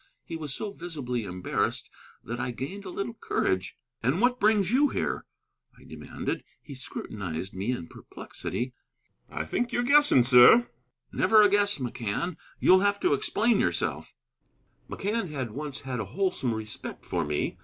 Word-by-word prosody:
He 165 - -7
was 155 -4 -5
so 205 +9 -4
visibly 140 - -4
embarrassed 90 -1 -2 0.3
that 120 +1 -5
I - - -2
gained 140 - -6
a - - -5
little 200 +5 -4
courage. 95 - -1 0.2
"And 135 +10 +1
what 245 +2 +2
brings 210 -2 +3
you 280 +4 +4
here?" - - -2 0.5
I - - -18
demanded. - - -5 0.2
He 145 - -11
scrutinized 100 -8 -6
me 100 +6 -2
in 120 -9 -4
perplexity. 125 +8 -6 0.6
"I - - -4
think 240 0 -1
you're 245 - 0
guessing, 285 - +6
sir." 125 - +7 0.4
"Never 215 -1 +5
a 205 - +6
guess, 205 0 +3
McCann. 125 - -3 0.2
You'll 185 +1 +6
have 200 +1 +1
to - - +3
explain 215 - +1
yourself." - - -1 0.7
McCann 205 -1 -2
had 130 -6 -4
once 145 +3 -6
had 130 -2 -4
a 110 - -2
wholesome 175 - -1
respect 110 -1 -7
for 85 -2 -1
me. 75 0 -2
150 Hz, 155 wpm, -27 LUFS, -, 0.7 s, sir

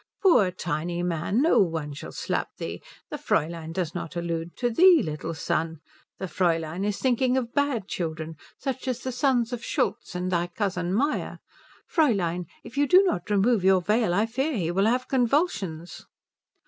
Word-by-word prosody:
"Poor 250 - +5
tiny 175 -1 -3
man, 180 - 0
no 330 - +4
one 160 -6 0
shall 140 - -8
slap - - -2
thee. 85 +1 -5 0.3
The - - -3
Fräulein 165 +1 -1
does 170 -2 -2
not 170 -1 -6
allude 170 -1 -3
to 245 -1 0
thee, 350 +5 +6
little 160 +1 -4
son. 160 +1 -2 0.4
The - - -4
Fräulein 165 0 0
is 205 0 -1
thinking 255 0 +2
of 240 -2 -2
bad 280 -8 0
children 160 -3 -4 0.2
such 265 -1 -4
as 250 -1 -2
the 260 - -3
sons 250 -2 +1
of 240 -1 -5
Schultz - - -2
and 180 +1 -2
thy 175 -1 +1
cousin 180 -1 -2
Meyer. 275 +10 0 0.5
Fräulein, 180 - +1 0.2
if 275 - -6
you 290 - +3
do 370 +7 +7
not 210 - -1
remove 205 +1 +3
your 190 0 +5
veil 210 +3 +1
I 205 +5 +2
fear 265 +5 -1
he 170 -3 -1
will 195 +4 +2
have 250 +2 +1
convulsions." 230 - -1
190 Hz, 175 wpm, -26 LUFS, 170-250 Hz, 0.5 s, do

